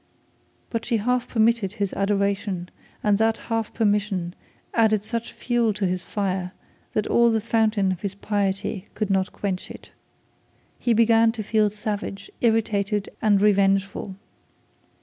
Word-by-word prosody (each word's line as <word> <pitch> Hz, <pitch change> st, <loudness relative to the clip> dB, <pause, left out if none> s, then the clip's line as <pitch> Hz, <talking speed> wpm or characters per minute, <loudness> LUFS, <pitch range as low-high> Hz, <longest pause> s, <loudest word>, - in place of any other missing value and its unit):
But 230 Hz, -1 st, -2 dB
she 235 Hz, -, 0 dB
half 250 Hz, +3 st, 0 dB
permitted 225 Hz, -3 st, +2 dB
his 205 Hz, -3 st, -2 dB
adoration, 200 Hz, -2 st, -1 dB, 0.3 s
and 205 Hz, -1 st, +3 dB
that 225 Hz, 0 st, +2 dB
half 225 Hz, -2 st, -3 dB
permission 205 Hz, -5 st, 0 dB, 0.4 s
added 215 Hz, -3 st, +3 dB
such 230 Hz, +1 st, -4 dB
fuel 240 Hz, -3 st, 0 dB
to 205 Hz, -1 st, -1 dB
his 180 Hz, 0 st, -1 dB
fire 185 Hz, -2 st, -2 dB, 0.4 s
that 215 Hz, -, 0 dB
all 235 Hz, 0 st, +4 dB
the 225 Hz, -1 st, +2 dB
fountain 220 Hz, -3 st, +1 dB
of 185 Hz, -, -5 dB, 0.2 s
piety 200 Hz, -1 st, -1 dB
could 210 Hz, -2 st, -1 dB
not 190 Hz, -1 st, +1 dB
quench 190 Hz, -2 st, -4 dB
it. -, -, -11 dB, 0.9 s
He 240 Hz, -, +2 dB
began 225 Hz, 0 st, +5 dB
to 220 Hz, -2 st, -5 dB
feel 215 Hz, 0 st, +2 dB
savage, 205 Hz, -1 st, -5 dB
irritated, 210 Hz, -3 st, +1 dB
and 205 Hz, -2 st, +4 dB
revengeful. 195 Hz, -1 st, +2 dB
210 Hz, 135 wpm, -24 LUFS, 195-225 Hz, 0.9 s, began